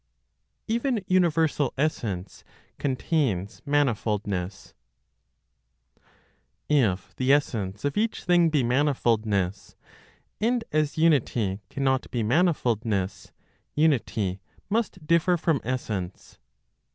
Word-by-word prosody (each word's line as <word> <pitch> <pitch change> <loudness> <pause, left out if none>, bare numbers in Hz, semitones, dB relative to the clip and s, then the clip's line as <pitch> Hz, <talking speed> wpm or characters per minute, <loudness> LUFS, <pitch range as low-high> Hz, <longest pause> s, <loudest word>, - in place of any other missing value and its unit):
EVEN 235 -2 0
UNIVERSAL 165 -6 +2
ESSENCE 110 - -2 0.4
CONTAINS 130 - -1
MANIFOLDNESS. 105 -9 -1 1.9
If 110 -11 +1
the 130 +1 +2
essence 105 -8 0
of 145 - -1
each 220 +2 -1
thing 175 -1 +4
be 150 -4 +2
manifoldness, 115 -7 0 0.6
and 235 +2 +1
as 155 0 0
unity 120 -11 +2
cannot 135 -1 0
be 120 -3 -1
manifoldness, 115 - 0 0.4
unity 115 - +1 0.3
must 205 -7 -1
differ 170 +2 +3
from 160 -4 +1
essence. 105 -7 -4
135 Hz, 85 wpm, -26 LUFS, 105-160 Hz, 1.9 s, thing